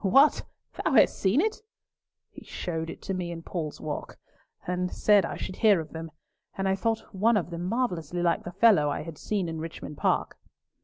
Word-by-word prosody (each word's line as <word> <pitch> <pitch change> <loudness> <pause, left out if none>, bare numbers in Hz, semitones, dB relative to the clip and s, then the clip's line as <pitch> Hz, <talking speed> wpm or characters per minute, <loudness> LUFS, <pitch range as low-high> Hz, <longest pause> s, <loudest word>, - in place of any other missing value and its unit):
What! 270 +10 +5 0.4
Thou - - +1
hast - - +5
seen 205 +10 +3
it?" 440 +2 -1 0.7
"He - - -12
showed 165 -2 -4
it - - -9
to 195 - -3
me 180 -2 -3
in 165 -1 -6
Paul's 160 -5 -4
Walk, 150 -1 -5 0.5
and 180 0 -1
said 205 -2 +4
I - - -5
should 185 - -6
hear 210 -5 +5
of 160 -1 -7
them, 165 0 -6 0.5
and 195 0 0
I 190 - +3
thought 225 +3 -2
one 215 +4 +3
of 175 -3 -2
them 170 +1 -4
marvellously 180 - -1
like 170 -1 +2
the 175 - -6
fellow 190 -6 +5
I - - -2
had 160 -2 -9
seen 200 -4 -1
in 160 -1 -4
Richmond 160 -2 -7
Park." - - 0
180 Hz, 200 wpm, -27 LUFS, 165-210 Hz, 0.7 s, What